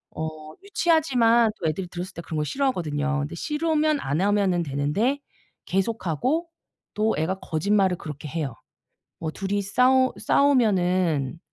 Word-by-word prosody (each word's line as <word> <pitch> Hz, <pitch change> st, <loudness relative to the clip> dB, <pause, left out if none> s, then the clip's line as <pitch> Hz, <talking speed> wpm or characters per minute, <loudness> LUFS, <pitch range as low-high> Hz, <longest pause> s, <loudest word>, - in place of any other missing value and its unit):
어 155 Hz, -1 st, -6 dB
유치하지만 260 Hz, -, +3 dB
또 165 Hz, -, -1 dB
애들이 175 Hz, +4 st, -2 dB
들었을 180 Hz, +2 st, -6 dB
때 170 Hz, -, -7 dB
그런 160 Hz, -, -5 dB
거 -, -, +1 dB
싫어하거든요. 150 Hz, -, -1 dB
근데 145 Hz, +4 st, -4 dB
싫으면 305 Hz, -, 0 dB
안 145 Hz, +6 st, -1 dB
하면은 200 Hz, -3 st, +2 dB
되는데 150 Hz, -, 0 dB, 0.5 s
계속 195 Hz, +3 st, -1 dB
하고 275 Hz, -, 0 dB, 0.5 s
또 215 Hz, +1 st, +1 dB
애가 185 Hz, +5 st, -1 dB
거짓말을 190 Hz, +2 st, +1 dB
그렇게 150 Hz, -1 st, -7 dB
해요. 145 Hz, -7 st, -3 dB, 0.6 s
뭐 160 Hz, -1 st, -3 dB
둘이 200 Hz, +2 st, -2 dB
싸우 255 Hz, +6 st, +3 dB
싸우면은 185 Hz, -, +2 dB
190 Hz, 310 characters per minute, -25 LUFS, 160-250 Hz, 0.6 s, 유치하지만